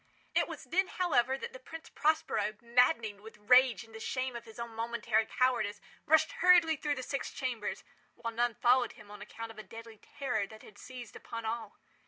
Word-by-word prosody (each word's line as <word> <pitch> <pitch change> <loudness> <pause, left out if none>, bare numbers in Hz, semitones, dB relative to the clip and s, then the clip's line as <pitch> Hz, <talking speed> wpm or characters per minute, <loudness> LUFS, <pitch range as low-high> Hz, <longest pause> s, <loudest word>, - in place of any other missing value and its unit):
It - - +2
was - - -7
then, 375 +2 +1
however, 265 -9 +1
that 470 - -7
the - - -9
Prince 325 -10 -10
Prospero, 295 -9 +1
maddening 235 -3 +2
with 220 0 -12
rage 250 +3 +5
and 225 0 -17
the 220 - -8
shame 255 +2 -2
of 235 -1 -7
his 225 -1 -13
own 235 -1 -6
momentary 230 -1 0
cowardice, 235 -5 +1 0.3
rushed 315 +1 +5
hurriedly 345 -3 +6
through 295 0 -1
the 255 - -5
six 275 +2 -3
chambers, 245 -5 -3 0.3
while 230 -1 -5
none 240 0 +1
followed 250 +2 +3
him 210 -1 -15
on 210 0 -10
account 225 +2 -7
of 220 - -12
a - - -7
deadly 225 -1 -11 0.2
terror 260 -8 0
that 215 +1 -13
had 205 -1 -15
seized 250 -3 -9
upon 230 -1 -7
all. 220 -1 -4
235 Hz, 200 wpm, -32 LUFS, 220-265 Hz, 0.3 s, hurriedly